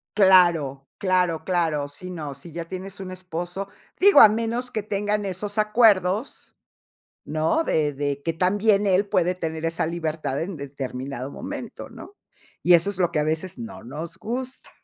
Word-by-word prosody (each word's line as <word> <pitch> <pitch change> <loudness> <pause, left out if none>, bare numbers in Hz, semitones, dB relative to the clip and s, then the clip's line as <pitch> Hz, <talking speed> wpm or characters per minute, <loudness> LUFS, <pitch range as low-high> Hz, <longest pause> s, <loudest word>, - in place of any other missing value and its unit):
Claro, 170 -9 +4
claro, 180 -4 +1
claro. 165 -6 0
Sí, 165 +6 -10
no. 155 -6 -5
Si 170 +5 -12
ya 170 +1 -5
tienes 190 +3 -7
un 190 -1 -6
esposo, 180 +1 -5 0.3
digo, 400 +2 +7
a 215 - +10
menos 230 +3 -2
que 215 - -3
tengan 205 0 -1
esos 200 +2 -4
acuerdos, 210 0 +2 0.7
¿no?, 155 - +1
de 150 - +1
de 140 0 -3
que 165 - -1
también 200 +4 +2
él 195 +1 +3
puede 180 -1 +2
tener 160 -2 -4
esa 165 -1 0
libertad 160 -4 -3
en 175 +2 -4
determinado 135 -1 -6
momento, - - -7
¿no?, 405 - -12 0.5
y 175 - +6
eso 170 +4 +4
es 195 - -8
lo 175 -2 +2
que 160 - -1
a 150 - +1
veces 160 +3 -2
no 230 -1 -8
nos 155 +7 -6
gusta. 255 +3 -5
180 Hz, 165 wpm, -24 LUFS, 155-205 Hz, 0.7 s, a